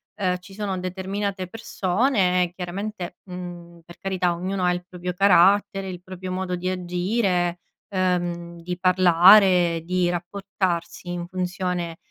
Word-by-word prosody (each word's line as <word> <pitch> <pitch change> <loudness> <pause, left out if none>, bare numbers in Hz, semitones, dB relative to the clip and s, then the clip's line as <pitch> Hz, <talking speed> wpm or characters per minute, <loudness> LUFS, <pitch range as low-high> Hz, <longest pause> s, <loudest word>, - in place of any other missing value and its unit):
ehm, 185 -3 0
ci 195 +2 -15
sono 200 -2 -3
determinate 190 +1 -3
persone 185 -3 +1
chiaramente, 185 0 -5
mhmm, 175 -2 -9
per 175 - -14
carità 185 -2 0
ognuno 185 +2 -3
ha 180 - +3
il 175 0 -3
proprio 180 0 -5
carattere, 195 +1 +4
il 180 -1 -7
proprio 185 0 -7
modo 185 -1 -2
di 180 +1 -3
agire, 180 0 0 0.3
ehm, 175 -2 -1
di 180 +1 -4
parlare, 180 -1 +6
di 180 0 +1
rapportarsi 180 -1 -3
in 175 -1 -3
funzione, 180 -2 -3
180 Hz, 130 wpm, -24 LUFS, 175-190 Hz, 0.3 s, parlare